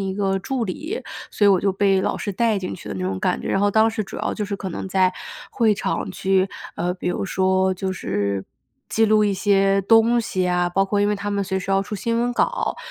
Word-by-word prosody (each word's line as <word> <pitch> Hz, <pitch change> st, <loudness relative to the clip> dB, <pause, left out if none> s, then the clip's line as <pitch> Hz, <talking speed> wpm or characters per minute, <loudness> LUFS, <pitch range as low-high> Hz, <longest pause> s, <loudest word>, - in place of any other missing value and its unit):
一 190 Hz, -1 st, -2 dB
个 195 Hz, -1 st, 0 dB
助 250 Hz, +4 st, -2 dB
理， 315 Hz, -, -4 dB, 0.3 s
所 210 Hz, -, 0 dB
以 -, -, +7 dB
我 190 Hz, -2 st, +4 dB
就 195 Hz, -, +1 dB
被 195 Hz, 0 st, +2 dB
老 -, -, -1 dB
师 205 Hz, -, -4 dB
带 225 Hz, +1 st, +1 dB
进 185 Hz, -1 st, -4 dB
去 -, -, -10 dB
的 -, -, -4 dB
那 95 Hz, -1 st, -3 dB
种 95 Hz, +1 st, -2 dB
感 -, -, 0 dB
觉。 -, -, -5 dB
然 195 Hz, -, +1 dB
后 205 Hz, -, +3 dB
当 220 Hz, +2 st, +4 dB
时 220 Hz, -1 st, -2 dB
主 -, -, -9 dB
要 -, -, -2 dB
就 210 Hz, -, -3 dB
是 200 Hz, 0 st, -4 dB
可 195 Hz, -, -5 dB
能 180 Hz, -, -5 dB
在 185 Hz, -1 st, +2 dB, 0.4 s
会 225 Hz, -5 st, +2 dB
场 -, -, -2 dB
去 190 Hz, 0 st, +1 dB, 0.3 s
呃， 175 Hz, +1 st, -1 dB
比 180 Hz, -, -4 dB
如 180 Hz, -, -2 dB
说， 190 Hz, 0 st, +1 dB
就 190 Hz, +1 st, -3 dB
是 100 Hz, -, -2 dB, 0.4 s
记 225 Hz, -, +2 dB
录 215 Hz, -1 st, +4 dB
一 200 Hz, -, +1 dB
些 195 Hz, 0 st, +3 dB
东 225 Hz, +3 st, +4 dB
西 185 Hz, -5 st, -1 dB
啊， 180 Hz, 0 st, +1 dB
包 195 Hz, +2 st, +1 dB
括 200 Hz, +1 st, 0 dB
因 205 Hz, -, +2 dB
为 210 Hz, -, +1 dB
他 205 Hz, +1 st, -4 dB
们 200 Hz, 0 st, 0 dB
随 190 Hz, 0 st, -2 dB
时 185 Hz, -, -5 dB
要 195 Hz, 0 st, +3 dB
出 205 Hz, +2 st, -6 dB
新 230 Hz, +4 st, -1 dB
闻 245 Hz, +1 st, 0 dB
稿， -, -, 0 dB
195 Hz, 275 characters per minute, -22 LUFS, 185-215 Hz, 0.4 s, 以